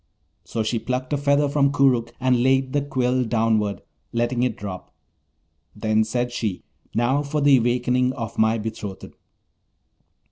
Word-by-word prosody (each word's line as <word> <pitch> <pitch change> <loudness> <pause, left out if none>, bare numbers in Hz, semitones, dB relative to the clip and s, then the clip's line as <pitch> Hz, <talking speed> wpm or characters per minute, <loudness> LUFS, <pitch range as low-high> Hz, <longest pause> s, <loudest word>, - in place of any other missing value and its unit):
So 115 - -3
she 115 +1 -1
plucked 130 +4 -3
a - - +3
feather 140 +1 +2
from 140 -1 +2
Koorookh 130 -5 +2
and 130 -2 +2
laid 130 +1 +2
the 145 - +2
quill 130 -2 0
downward, 110 -3 0 0.3
letting 120 +1 0
it 125 -3 0
drop. 95 -3 -7 0.8
Then 110 0 +1
said 120 +2 -2
she, 110 -6 -3 0.3
'Now 125 +5 +2
for 150 +1 -2
the 145 -2 +5
awakening 125 +1 +1
of 115 -4 -6
my 110 +1 +3
betrothed!' 105 -3 -6
125 Hz, 145 wpm, -23 LUFS, 110-135 Hz, 0.8 s, the